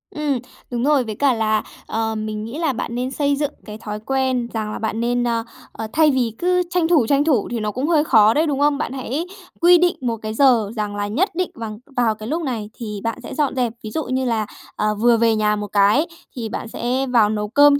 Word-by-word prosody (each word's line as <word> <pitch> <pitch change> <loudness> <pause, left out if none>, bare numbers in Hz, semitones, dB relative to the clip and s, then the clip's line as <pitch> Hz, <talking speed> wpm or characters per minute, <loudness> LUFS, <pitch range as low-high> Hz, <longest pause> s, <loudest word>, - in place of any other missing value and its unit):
Ừm, 295 -4 0 0.3
đúng 240 -1 -1
rồi, 285 -1 +3
với 220 -3 -5
cả 275 +3 +3
là, 215 -2 +1 0.2
ờ, 225 0 -1
mình 215 0 -4
nghĩ 230 +6 -6
là 320 -5 +1
bạn 235 0 -4
nên 250 +2 -2
xây 285 +1 +1
dựng 290 0 -1
cái 210 -1 -8
thói 210 -1 -6
quen 260 +1 0
rằng 215 -2 -2
là - - -5
bạn 220 0 -2
nên, 245 +1 +1
ờ, 230 -1 0 0.3
ờ, 220 - -6
thay 310 -1 +5
vì 250 -4 +1
cứ 360 +4 +2
tranh 355 -2 +1
thủ, 310 -9 +3
tranh 280 +2 +3
thủ 285 -9 +2
thì 240 - -1
nó 215 -1 -2
cũng 255 +7 -2
hơi 320 -3 +3
khó 220 -7 +5
đấy, 315 +5 +2
đúng 280 -2 -1
không? 290 0 +3
Bạn 275 - -3
hãy 270 +5 -3 0.4
quy 350 +1 +7
định 350 0 +2
một 235 -3 -1
cái 215 0 -4
giờ 230 -5 +4
rằng 210 -2 -3
là 205 0 -2
nhất 305 - +1
định 365 0 -1
vằng 215 -2 -6 0.2
vào 230 -3 +2
cái 215 0 -8
lúc 320 +6 -1
này 235 -8 -3
thì 210 -5 -6
bạn 230 0 -2
sẽ - - -7
dọn 295 -4 0
dẹp, 245 -3 0
ví 215 - -6
dụ 315 - -2
như 260 0 -1
là, 225 -3 0 0.3
ờ, 210 0 0
vừa 230 +2 +4
về 225 -1 +3
nhà 210 0 +2
một 210 0 -4
cái 205 - +3 0.3
thì 230 -3 -4
bạn 230 - -5
sẽ 250 +4 -1
vào 235 -4 +4
nấu 210 -1 -1
cơm 285 +5 +5
240 Hz, 255 wpm, -21 LUFS, 215-285 Hz, 0.4 s, quy